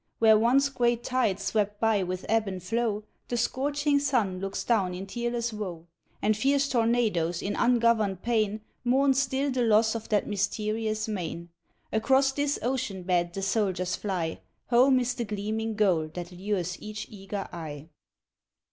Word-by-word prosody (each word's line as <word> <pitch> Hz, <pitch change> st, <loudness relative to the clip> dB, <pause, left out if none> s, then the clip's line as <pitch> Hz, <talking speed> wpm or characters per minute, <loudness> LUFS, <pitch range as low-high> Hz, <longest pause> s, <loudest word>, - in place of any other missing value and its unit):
Where 220 Hz, -1 st, +6 dB
once 245 Hz, +6 st, +4 dB
great 240 Hz, -3 st, +1 dB
tides 215 Hz, -7 st, 0 dB
swept 205 Hz, 0 st, 0 dB
by 220 Hz, -3 st, +2 dB
with 185 Hz, 0 st, -3 dB
ebb 220 Hz, -1 st, +2 dB
and 185 Hz, -2 st, -5 dB
flow 220 Hz, +1 st, -1 dB, 0.2 s
The 240 Hz, -, -2 dB
scorching 285 Hz, +4 st, +1 dB
sun 240 Hz, -10 st, 0 dB
looks 195 Hz, +1 st, -3 dB
down 195 Hz, -6 st, +1 dB
in 190 Hz, +2 st, -5 dB
tearless 235 Hz, +2 st, -2 dB
woe. 180 Hz, -6 st, -5 dB, 0.4 s
And 215 Hz, +1 st, +3 dB
fierce 275 Hz, +5 st, +2 dB
tornadoes 225 Hz, -9 st, +1 dB
in 200 Hz, -, -2 dB
ungoverned 230 Hz, -5 st, +2 dB
pain 215 Hz, -2 st, 0 dB, 0.2 s
Mourn 265 Hz, +3 st, +3 dB
still 270 Hz, +1 st, 0 dB
the 255 Hz, -1 st, 0 dB
loss 220 Hz, -1 st, +4 dB
of 230 Hz, -1 st, -6 dB
that 210 Hz, -2 st, +2 dB
mysterious 215 Hz, +2 st, -1 dB
main. 175 Hz, -4 st, -4 dB, 0.4 s
Across 265 Hz, +5 st, +3 dB
this 285 Hz, +1 st, 0 dB
ocean 230 Hz, -7 st, -2 dB
bed 175 Hz, -1 st, +1 dB
the 195 Hz, -, -4 dB
soldiers 190 Hz, -3 st, 0 dB
fly 180 Hz, -6 st, -3 dB, 0.3 s
Home 255 Hz, +2 st, +5 dB
is 245 Hz, 0 st, 0 dB
the 240 Hz, -, -3 dB
gleaming 215 Hz, +2 st, -3 dB
goal 180 Hz, -7 st, +2 dB
that 175 Hz, 0 st, -6 dB
lures 180 Hz, -1 st, -3 dB
each 215 Hz, 0 st, -6 dB
eager 195 Hz, -1 st, -5 dB
eye. 155 Hz, -3 st, -7 dB
215 Hz, 155 wpm, -27 LUFS, 195-240 Hz, 0.4 s, Where